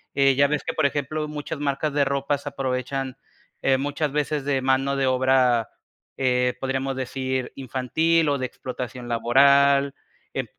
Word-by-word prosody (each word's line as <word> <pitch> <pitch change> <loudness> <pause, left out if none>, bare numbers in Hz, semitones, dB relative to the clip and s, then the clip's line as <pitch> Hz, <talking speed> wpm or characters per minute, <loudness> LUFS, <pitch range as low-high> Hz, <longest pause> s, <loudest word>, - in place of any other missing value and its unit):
eh, 135 -1 +4
ya 140 +1 +4
ves 150 0 -1
que, - - -2
por 155 - +1
ejemplo, 150 +2 -1
muchas 150 +1 -5
marcas 145 +1 -1
de 145 - +3
ropas 140 +1 -1
aprovechan, 135 -1 -3 0.5
eh, 135 -1 +3
muchas 145 +2 -2
veces 150 -1 -1
de 135 -2 0
mano 135 +1 +1
de 135 - +1
obra, 130 -2 +3 0.5
eh, 125 -1 +1
podríamos 135 0 -2
decir, 130 0 -3
infantil 150 +5 +1
o 145 -1 +1
de 130 -1 -2
explotación 125 -1 -7
laboral, 140 +4 +4 0.4
eh, - - -2
135 Hz, 155 wpm, -24 LUFS, 130-140 Hz, 0.5 s, eh